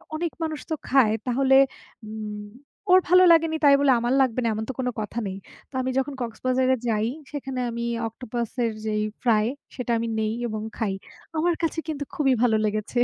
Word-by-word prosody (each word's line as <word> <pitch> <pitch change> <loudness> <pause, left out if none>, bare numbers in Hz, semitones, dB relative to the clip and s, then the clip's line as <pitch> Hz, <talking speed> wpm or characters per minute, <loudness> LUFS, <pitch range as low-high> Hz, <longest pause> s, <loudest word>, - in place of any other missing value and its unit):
অনেক 335 -1 -2
মানুষ 315 -2 -3
তো 315 - 0
খায়। 250 -5 +4
তাহলে 265 +2 +3 0.5
উম 210 -1 -6 0.5
ওর 370 - +9
ভালো 365 +1 +7
লাগেনি 325 -1 +4
তাই 280 -1 +7
বলে 280 -2 +4
আমার 240 +2 0
লাগবে 255 -2 +1
না, - - +1
এমন 220 +1 -3
তো - - -2
কোনো 250 -1 0
কথা 215 +2 -3
নেই। 190 0 -5 0.3
তা 270 - -14
আমি 260 0 -1
যখন 275 +1 0
কক্সবাজারে 255 +2 +1
যাই, 220 0 +1 0.2
সেখানে 270 -3 -4
আমি 235 0 -3 0.2
অক্টোপাস 235 0 -5
এর 230 - +1
যেই 215 -1 0 0.2
ফ্রাই 220 -3 +3 0.3
সেটা 245 -2 -3
আমি 230 0 -2
নেই 215 0 0
এবং 215 -1 -4 0.2
খাই। 210 -4 -1 0.4
আমার 340 +1 +2
কাছে 325 0 0
কিন্তু 295 -2 -3
খুবই 270 -3 +3
ভালো 220 -3 +4
লেগেছে। 215 +3 -1
250 Hz, 190 wpm, -25 LUFS, 220-280 Hz, 0.5 s, ওর